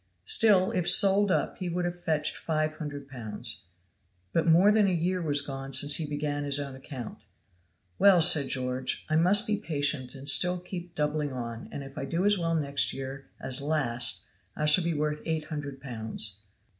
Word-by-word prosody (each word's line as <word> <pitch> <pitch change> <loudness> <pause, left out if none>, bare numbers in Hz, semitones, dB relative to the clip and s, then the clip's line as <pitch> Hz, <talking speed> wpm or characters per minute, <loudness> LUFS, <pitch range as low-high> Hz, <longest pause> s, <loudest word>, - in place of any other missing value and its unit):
Still 195 - +4
if 180 -5 +1
sold 200 +1 +6
up - - -1
he 185 -2 -4
would 175 +1 -2
have 175 0 -5
fetched 155 -2 -1
five 155 -1 -2
hundred 145 -3 -7
pounds. 115 -5 -7 0.7
But 165 - 0
more 175 +5 +5
than 210 -1 +3
a - - +1
year 180 +2 -1
was 145 -3 +2
gone 135 -1 -7
since 145 +3 +5
he 160 - -4
began 145 0 -3
on 145 - -4
his 140 0 +1
own 140 -2 -6
account. 130 -3 -9 0.8
"Well," 195 -3 +6
said 160 -4 +6
George, 130 0 -3
"I - - +2
must 190 +7 +4
be 215 -2 -1
patient 145 -5 -2
and 135 +1 -11
still 180 +4 +4
keep 175 -1 -9
doubling 150 -1 -2
on, 115 -2 -7
and 140 - -7
if 135 +2 -10
I 135 - -4
do 165 +7 -2
as 205 0 +4
well 165 -3 -1
next 140 -3 0
year 135 0 -8
as 130 0 -3
last 120 -6 -1 0.3
I 150 - -2
shall 150 +4 +5
be 170 -1 -2
worth 150 0 -2
eight 160 -1 -2
hundred 145 -3 -7
pounds." 110 -6 -6
150 Hz, 195 wpm, -27 LUFS, 135-175 Hz, 0.8 s, sold